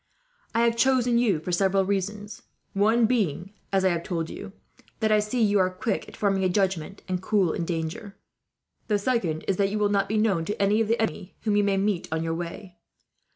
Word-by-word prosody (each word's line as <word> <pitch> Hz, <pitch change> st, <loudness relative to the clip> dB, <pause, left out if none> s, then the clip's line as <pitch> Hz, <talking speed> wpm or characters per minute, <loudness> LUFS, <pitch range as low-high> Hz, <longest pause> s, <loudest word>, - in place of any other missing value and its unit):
"I 230 Hz, -, +3 dB
have 235 Hz, 0 st, +3 dB
chosen 245 Hz, -2 st, +3 dB
you 215 Hz, -9 st, +2 dB
for 170 Hz, +4 st, -5 dB
several 195 Hz, +2 st, +2 dB
reasons, 205 Hz, +2 st, -3 dB, 0.3 s
one 220 Hz, +4 st, +3 dB
being, 200 Hz, -, -1 dB, 0.2 s
as 190 Hz, -1 st, +2 dB
I -, -, +5 dB
have 170 Hz, -2 st, -1 dB
told 170 Hz, -2 st, -3 dB
you, -, -, -8 dB, 0.5 s
that 220 Hz, -1 st, +1 dB
I 215 Hz, -, +5 dB
see 210 Hz, +3 st, 0 dB
you 205 Hz, -1 st, +3 dB
are 185 Hz, -1 st, +3 dB
quick 185 Hz, +5 st, -3 dB
at -, -, -12 dB
forming 195 Hz, -2 st, +1 dB
a 185 Hz, -, +2 dB
judgment, 190 Hz, -1 st, -1 dB
and 185 Hz, -1 st, -2 dB
cool 190 Hz, -4 st, +1 dB
in 170 Hz, -, -2 dB
danger. 170 Hz, +5 st, -4 dB, 0.7 s
The 210 Hz, -, +2 dB
second 200 Hz, -8 st, -1 dB
is 190 Hz, -, +1 dB
that 195 Hz, -1 st, +2 dB
you 210 Hz, -, -2 dB
will 210 Hz, -1 st, +2 dB
not 200 Hz, -1 st, +1 dB
be 215 Hz, -, 0 dB
known 205 Hz, -6 st, +2 dB
to 205 Hz, -, -4 dB
any 205 Hz, +2 st, +3 dB
of 225 Hz, -, 0 dB
the 230 Hz, +2 st, +1 dB
enemy 180 Hz, -3 st, -3 dB
whom 210 Hz, -2 st, 0 dB
you 205 Hz, -, +3 dB
may 200 Hz, -1 st, +1 dB
meet 195 Hz, -2 st, 0 dB
on 160 Hz, 0 st, -1 dB
your 165 Hz, 0 st, -1 dB
way. 175 Hz, +2 st, -7 dB
200 Hz, 220 wpm, -26 LUFS, 180-215 Hz, 0.7 s, I